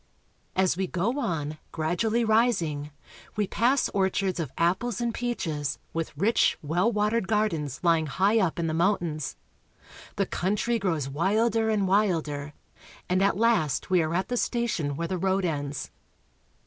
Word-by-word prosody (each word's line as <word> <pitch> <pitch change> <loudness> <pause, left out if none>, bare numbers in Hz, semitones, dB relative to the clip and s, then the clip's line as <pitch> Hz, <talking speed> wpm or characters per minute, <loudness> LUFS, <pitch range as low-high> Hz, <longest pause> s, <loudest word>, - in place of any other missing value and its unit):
As 185 -2 +3
we 190 +1 -1
go 205 +11 -1
on, 155 - -2
gradually 215 +9 0
rising, 195 -11 +1 0.5
we 210 -1 +1
pass 245 +7 +2
orchards 190 -1 0
of 155 -6 -3
apples 190 +7 +1
and 235 -1 -1
peaches, 160 - -2 0.2
with 165 -3 -4
rich, 210 +8 +3
well 175 +9 +1
watered 210 -1 +1
gardens 165 - 0
lying 165 -2 +3
high 195 +9 +2
up 185 -6 0
in 170 - -1
the 160 - -1
mountains. 170 -4 0 0.8
The 195 - +1
country 210 +6 0
grows 165 -8 -1
wilder 215 +9 +1
and 205 -3 +1
wilder, 160 -8 0 0.5
and 185 +1 +1
at 195 -1 +2
last 220 - +1
we 180 -2 +5
are 160 +1 -1
at 185 - -1
the 245 - -1
station 225 - -1
where 170 +3 -2
the 185 +1 -2
road 190 +1 +1
ends. 145 -4 -3
185 Hz, 150 wpm, -27 LUFS, 160-215 Hz, 0.8 s, we